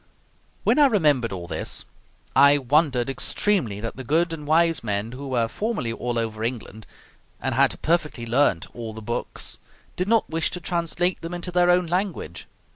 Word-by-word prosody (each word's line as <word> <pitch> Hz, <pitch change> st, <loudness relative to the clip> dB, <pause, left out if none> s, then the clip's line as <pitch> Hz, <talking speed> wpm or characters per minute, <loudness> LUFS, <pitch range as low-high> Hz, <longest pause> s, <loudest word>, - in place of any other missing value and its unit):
When -, -, +3 dB
I 290 Hz, -, +7 dB
remembered 150 Hz, -, +2 dB
all 90 Hz, -2 st, -5 dB
this, -, -, -1 dB, 0.5 s
I 140 Hz, +2 st, +7 dB
wondered 135 Hz, -2 st, +2 dB
extremely 135 Hz, -, 0 dB
that 115 Hz, +2 st, -5 dB
the 130 Hz, -, -6 dB
good 165 Hz, +6 st, +1 dB
and 150 Hz, -2 st, -7 dB
wise 165 Hz, -2 st, +3 dB
men, 105 Hz, +1 st, -2 dB
who 135 Hz, +3 st, -7 dB
were 120 Hz, -3 st, +1 dB
formerly 205 Hz, -, -2 dB
all 120 Hz, +1 st, -3 dB
over 110 Hz, -1 st, -2 dB
England, 115 Hz, -2 st, -4 dB, 0.5 s
and -, -, -2 dB
had -, -, +2 dB
perfectly 155 Hz, -7 st, 0 dB
learnt 115 Hz, -7 st, +2 dB
all 115 Hz, -2 st, -6 dB
the 110 Hz, -, -7 dB
books, 120 Hz, +3 st, -3 dB, 0.4 s
did 180 Hz, -, -2 dB
not 225 Hz, 0 st, +3 dB
wish 165 Hz, 0 st, 0 dB
to 180 Hz, -, -4 dB
translate 175 Hz, +1 st, -1 dB
them 165 Hz, +1 st, -5 dB
into 175 Hz, +1 st, -4 dB
their 180 Hz, 0 st, +3 dB
own 180 Hz, 0 st, +4 dB
language. 175 Hz, -, -3 dB
145 Hz, 175 wpm, -24 LUFS, 115-175 Hz, 0.5 s, I